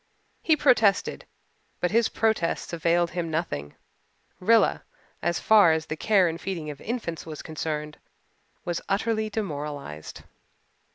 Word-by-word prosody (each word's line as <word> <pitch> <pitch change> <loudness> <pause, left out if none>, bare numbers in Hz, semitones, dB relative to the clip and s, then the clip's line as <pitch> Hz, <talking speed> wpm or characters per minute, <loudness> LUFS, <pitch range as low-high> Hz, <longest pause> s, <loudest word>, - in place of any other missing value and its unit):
He 320 - +4
protested, 225 -9 +3 0.5
but 180 - 0
his 230 +1 +3
protests 220 -7 0
availed 170 +1 +1
him 175 -2 -3
nothing. 115 - -3 0.6
Rilla, 225 +4 +3 0.4
as 170 -1 0
far 205 -7 +6
as 160 -1 -1
the 155 - -4
care 195 +2 +3
and 165 +1 -4
feeding 165 -6 -4
of 140 - -11
infants 220 -8 -4
was 155 -2 -7
concerned, 150 -1 -4 0.7
was 175 -1 -2
utterly 215 +2 0
demoralized. 145 - -5
170 Hz, 125 wpm, -26 LUFS, 155-215 Hz, 0.7 s, far